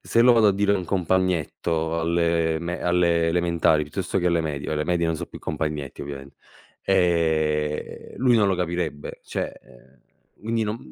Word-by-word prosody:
se 115 - +2
lo 125 0 +7
vado 110 -3 +5
a - - +4
dire 100 +1 +2
ad 100 - +2
un 90 - -5
compagnetto 85 -3 0
alle 85 -1 +1
me 85 +1 -4
alle 85 -1 +2
elementari 85 -3 +2
piuttosto 95 +5 -3
che 90 - 0
alle 85 -1 +2
medie 75 -3 -4
oh - - 0
le 75 - -1
medie 85 0 +1
non 80 - 0
sono - - -6
più - - -9
compagnetti 75 -3 -4
ovviamente, 70 -1 -8 0.5
ehm, 80 -5 0
lui 125 -2 +3
non 105 -2 +3
lo 95 - +1
capirebbe, 85 -4 -3
cioè, - - -4
ehm, 60 +1 -21 0.4
quindi 115 0 -1
non 105 +2 -3
85 Hz, 180 wpm, -24 LUFS, 75-95 Hz, 0.5 s, lo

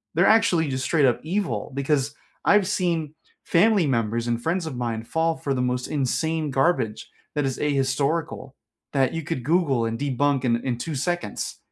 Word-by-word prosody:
They're - - +4
actually 205 -9 +4
just 130 0 -2
straight 150 0 +3
up 125 -3 +2
evil 160 - -2
because 140 0 0 0.3
I've 205 -2 +4
seen 170 -6 -1 0.3
family 200 +1 +3
members 115 -3 0
and 120 0 -1
friends 165 +5 -1
of 155 -5 -5
mine 115 -2 -3
fall 160 +6 0
for 150 -3 -2
the 130 - -1
most 125 0 -1
insane 155 +3 -1
garbage 135 -5 0 0.3
that 145 -2 +1
is 135 -1 -2
ahistorical, 140 0 -1 0.4
that 135 -1 +1
you 165 - -2
could 130 -4 -4
Google 145 -5 +2
and 115 0 -3
debunk 140 -1 +1
in 120 -1 +3
in 120 -2 -1
2 155 +4 -4
seconds, 175 - -3
140 Hz, 175 wpm, -24 LUFS, 125-165 Hz, 0.4 s, They're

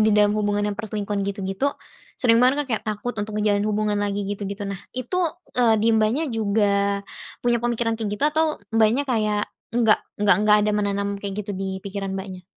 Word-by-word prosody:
di - - +4
dalam 210 0 +5
hubungan 205 0 0
yang 205 - -5
perselingkuhan 210 -2 -3
gitu-gitu, 195 +4 -2 0.5
sering 230 -2 +5
banget 265 +4 +4
kan, - - -17
kayak - - -8
takut 215 +3 -3
untuk 210 0 -4
ngejalin 205 -1 +2
hubungan 210 0 0
lagi, 205 0 -1
gitu-gitu. 200 0 -4
Nah, 200 -1 -4 0.2
itu, 255 +7 -2 0.4
eee, 235 -2 +5
di 225 - +3
Mbaknya 220 +8 +2
juga 200 -2 +1 0.4
punya 240 -1 +2
pemikiran 235 -1 0
kayak 220 -3 -2
gitu, 210 - -1
atau 315 +1 +2 0.3
Mbaknya, 225 +4 +4
kayak 215 -4 0 0.2
enggak 230 -2 +4 0.2
enggak 205 -1 +5
enggak 210 0 +6
ada - - +2
menanam 200 -1 0
kayak 200 -1 -4
gitu 205 - -6
di 190 0 -3
pikiran 195 -1 -4
Mbaknya? 190 -1 -7
210 Hz, 185 wpm, -23 LUFS, 200-225 Hz, 0.5 s, enggak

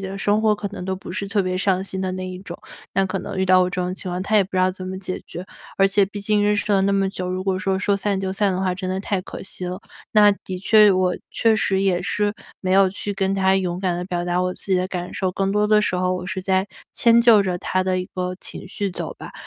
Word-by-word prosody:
的 195 +1 -6
生 205 +2 +2
活 215 -1 +3
可 205 -1 -5
能 200 -2 -8
都 190 0 -2
不 180 -1 -9
是 200 0 -3
特 200 -1 +1
别 185 0 -2
上 190 -1 +1
心 190 -1 -5
的 185 -1 -1
那 185 0 -4
一 185 - -7
种。 180 -2 -9 0.4
那 195 - +3
可 190 0 -2
能 - - -6
遇 190 - +1
到 185 0 +5
我 180 - +2
这 180 0 -3
种 180 +1 -2
情 185 -1 -5
况， 180 - -3
他 210 +3 -2
也 205 - +6
不 190 - -9
知 - - -2
道 185 0 +3
怎 185 0 -7
么 190 0 -5
解 185 -1 -5
决。 180 - -7 0.3
而 195 - +5
且 195 +1 +3
毕 205 +1 -8
竟 205 +1 +1
认 210 0 +2
识 205 - 0
了 195 - +4
那 200 +1 +2
么 195 -1 +2
久， 180 -1 -4
如 185 +1 -3
果 190 -1 0
说， 190 0 0
说 200 +1 +1
散 200 0 -1
就 190 0 -2
散 200 +1 +1
的 185 - -2
话， 185 -1 0
真 185 0 -5
的 185 - -1
太 195 -1 -2
可 - - -9
惜 185 -1 -5
了。 180 +1 -4 0.3
那 210 -2 +6
的 185 -1 -5
确 210 +2 +6
我 185 -1 +2 0.2
确 225 -1 +3
实 195 -3 +1
也 185 -3 +2
是 205 +3 0 0.3
没 185 -1 -1
有 195 0 +5
去 205 +2 -4
跟 195 -1 0
他 190 0 +3
勇 180 -2 -1
敢 185 -2 0
地 180 - -3
表 175 -2 -2
达 175 0 0
我 180 0 -1
自 - - -9
己 - - +5
的 185 +1 0
感 180 -1 -5
受， 190 -2 -1
更 195 +1 -1
多 210 0 +2
的 210 0 +5
时 195 - +1
候 185 0 0
我 180 0 -6
是 190 0 -3
在 190 +1 +1 0.3
迁 235 0 +5
就 230 -4 +6
着 180 -2 -2
他 185 +1 -1
的 185 -1 0
一 180 - -5
个 180 0 -2
情 - - -7
绪 200 +1 -3
走 175 - -5
吧。 - - -9
190 Hz, 315 characters per minute, -22 LUFS, 185-200 Hz, 0.4 s, 也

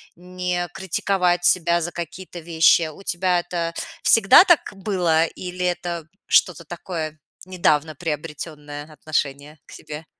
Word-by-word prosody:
не 180 0 -3
критиковать 180 -1 0
себя 170 -1 +3
за 170 +1 -3
какие-то 175 +1 -7
вещи? 165 0 +3
У 155 +5 -11
тебя 180 -1 +1
это 170 -1 -3 0.3
всегда 225 - +7
так 345 -5 +5
было 180 -5 +1
или 180 +2 -5
это 175 -2 -3 0.2
что-то 170 -3 +2
такое 160 -2 -6 0.3
недавно 160 -4 +1
приобретённое 150 -1 -6
отношение 150 -1 -3
к - - -17
себе? 150 +1 -9
170 Hz, 125 wpm, -22 LUFS, 155-180 Hz, 0.3 s, всегда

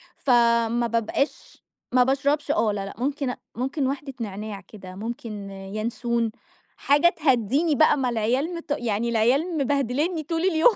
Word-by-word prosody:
فما 235 -2 +3
بابقاش 230 +5 -2 0.3
ما 250 0 +5
باشربش 285 +2 +1
آه 230 -9 +2
لا 200 -1 -3
لأ، 195 - -7
ممكن 275 +2 -1
أ 250 - -4 0.2
ممكن 265 +3 -1
واحدة 275 0 -4
نعناع 205 -1 -5
كده، 185 -1 -12
ممكن 215 -2 -6
يانسون، 220 +4 -2 0.5
حاجة 290 +4 +4
تهَدّيني 285 - +1
بقى، 310 0 +5
ما 255 -3 0
العيال 250 +9 0
مت 335 -3 -8
يعني 235 0 -1
العيال 265 +10 +2
مبهدلينني 285 +4 0
طول 325 +2 -2
اليوم، 360 +4 +4
245 Hz, 145 wpm, -25 LUFS, 225-290 Hz, 0.5 s, ما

